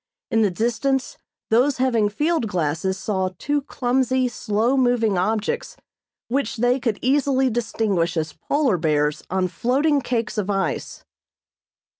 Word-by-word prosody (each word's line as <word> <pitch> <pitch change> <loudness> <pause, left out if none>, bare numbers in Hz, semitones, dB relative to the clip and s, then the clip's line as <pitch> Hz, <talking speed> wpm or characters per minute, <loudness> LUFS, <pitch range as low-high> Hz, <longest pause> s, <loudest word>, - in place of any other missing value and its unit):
In 225 -1 +3
the 210 - +3
distance 240 +6 -1 0.3
those 255 +5 +3
having 235 -5 +2
field 300 +3 0
glasses 180 +1 -1
saw 190 -2 -1
two 290 0 -1
clumsy, 260 -1 0
slow 230 +2 0
moving 245 -5 +2
objects 220 - -1 0.5
which 250 -2 -1
they 245 +3 +2
could 230 -5 -1
easily 265 -1 +2
distinguish 210 -7 0
as 155 -1 -2
polar 275 - 0
bears 150 -2 +1
on 185 0 0
floating 275 - +1
cakes 235 -3 -2
of 205 -1 -2
ice. 195 -1 -2
230 Hz, 130 wpm, -22 LUFS, 195-260 Hz, 0.5 s, In